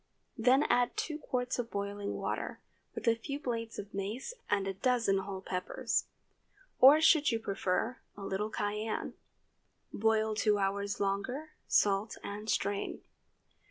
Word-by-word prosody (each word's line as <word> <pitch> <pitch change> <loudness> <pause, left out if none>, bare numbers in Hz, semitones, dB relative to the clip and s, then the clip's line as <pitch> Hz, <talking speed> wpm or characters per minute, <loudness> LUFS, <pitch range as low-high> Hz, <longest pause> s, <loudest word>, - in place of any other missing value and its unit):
Then 255 +5 +4
add 245 -3 +2
two 305 -1 -2
quarts 250 -3 -2
of 235 -1 -2
boiling 200 0 -3
water, - - -3 0.4
with - - -5
a 230 - +7
few 275 +5 -5
blades 230 -4 -3
of 205 0 -7
mace 210 - -4 0.2
and 200 -1 +2
a 195 - -1
dozen 230 -2 +2
whole 190 0 -5
peppers. 180 -1 -1 0.7
Or, 275 +4 +9
should 315 -2 +5
you 230 - +1
prefer, 200 +3 -1 0.2
a 200 - -7
little 195 +2 -2
cayenne. 210 +1 -2 0.8
Boil 220 0 +2
two 210 -1 +2
hours 200 0 -1
longer, 245 +10 -2 0.2
salt, 200 +1 +2
and 210 +2 -5
strain. 200 -1 -1
215 Hz, 140 wpm, -32 LUFS, 200-245 Hz, 0.8 s, Or